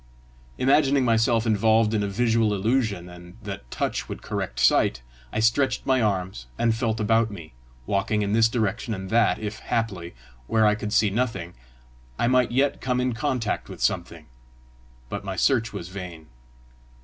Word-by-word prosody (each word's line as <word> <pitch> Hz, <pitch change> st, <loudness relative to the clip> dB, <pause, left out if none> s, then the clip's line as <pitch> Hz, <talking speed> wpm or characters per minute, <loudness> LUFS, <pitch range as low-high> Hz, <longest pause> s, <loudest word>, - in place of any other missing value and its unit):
Imagining 135 Hz, 0 st, +3 dB
myself 115 Hz, 0 st, +2 dB
involved 110 Hz, 0 st, +3 dB
in 105 Hz, -, +1 dB
a 100 Hz, -, -1 dB
visual 110 Hz, 0 st, +1 dB
illusion, 105 Hz, -3 st, 0 dB
and 90 Hz, +2 st, -13 dB
that 100 Hz, -12 st, -7 dB
touch -, -, -3 dB
would -, -, -7 dB
correct -, -, -4 dB
sight, 60 Hz, 0 st, +3 dB, 0.3 s
I -, -, -2 dB
stretched 115 Hz, +5 st, +2 dB
my 130 Hz, -1 st, +2 dB
arms 95 Hz, -, -2 dB
and 115 Hz, -1 st, +2 dB
felt 115 Hz, -1 st, -1 dB
about 115 Hz, +1 st, +2 dB
me, 85 Hz, -, -10 dB, 0.3 s
walking 100 Hz, -, 0 dB
in 100 Hz, 0 st, -1 dB
this 115 Hz, 0 st, +4 dB
direction 110 Hz, 0 st, -1 dB
and 95 Hz, +1 st, -7 dB
that, 110 Hz, -5 st, +3 dB
if 110 Hz, 0 st, -5 dB
haply, 95 Hz, -, -3 dB, 0.3 s
where 110 Hz, -1 st, +3 dB
I 105 Hz, -, +5 dB
could 105 Hz, -1 st, -4 dB
see 105 Hz, -1 st, +3 dB
nothing, 110 Hz, -6 st, -2 dB, 0.6 s
I -, -, +1 dB
might 125 Hz, 0 st, +3 dB
yet 135 Hz, +3 st, +1 dB
come 125 Hz, -1 st, 0 dB
in 125 Hz, -1 st, 0 dB
contact 125 Hz, -3 st, -2 dB
with -, -, -9 dB
something; -, -, -1 dB, 0.8 s
but 100 Hz, +10 st, -5 dB
my 95 Hz, -1 st, -4 dB
search 115 Hz, +4 st, +2 dB
was 90 Hz, -4 st, -7 dB
vain. 90 Hz, -4 st, -8 dB
110 Hz, 165 wpm, -25 LUFS, 95-115 Hz, 0.8 s, I